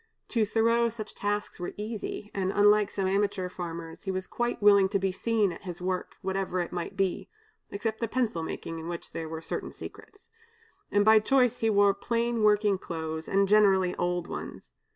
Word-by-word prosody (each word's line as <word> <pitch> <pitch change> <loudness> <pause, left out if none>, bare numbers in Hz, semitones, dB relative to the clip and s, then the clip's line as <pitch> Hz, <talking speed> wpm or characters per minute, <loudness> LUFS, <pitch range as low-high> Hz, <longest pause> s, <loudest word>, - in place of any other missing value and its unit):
To 225 -4 +1
Thoreau 230 +2 +3
such 215 -2 -7
tasks 205 0 -3
were 175 - -5
easy, 210 -1 -5
and, 190 -1 -1
unlike 205 0 +5
some 195 -2 -2
amateur 195 -1 0
farmers, 170 -2 -7
he - - -3
was 185 0 -2
quite 240 +4 -2
willing 200 -2 +6
to 200 - +1
be 190 0 0
seen 215 0 +1
at - - -9
his 180 -3 -7
work, 185 0 -3
whatever 190 -1 -1
it 175 - -2
might 180 +2 -5
be 195 -2 -1 0.4
(except 220 +2 -3
the 230 - -1
pencil 225 -8 -1
making, 165 0 -5
in 160 - -7
which 170 -1 -6
there 160 -1 -5
were 160 0 -6
certain - - -4
secrets), 405 - -12 0.6
and 205 0 +3
by 220 0 +7
choice 250 +2 +2
he 225 - +2
wore 200 -1 +5
plain 235 +1 -1
working 210 -2 +3
clothes, 160 -2 -5
and 195 0 +2
generally 195 -3 +4
old 175 0 -1
ones. - - -8
200 Hz, 190 wpm, -28 LUFS, 180-215 Hz, 0.6 s, by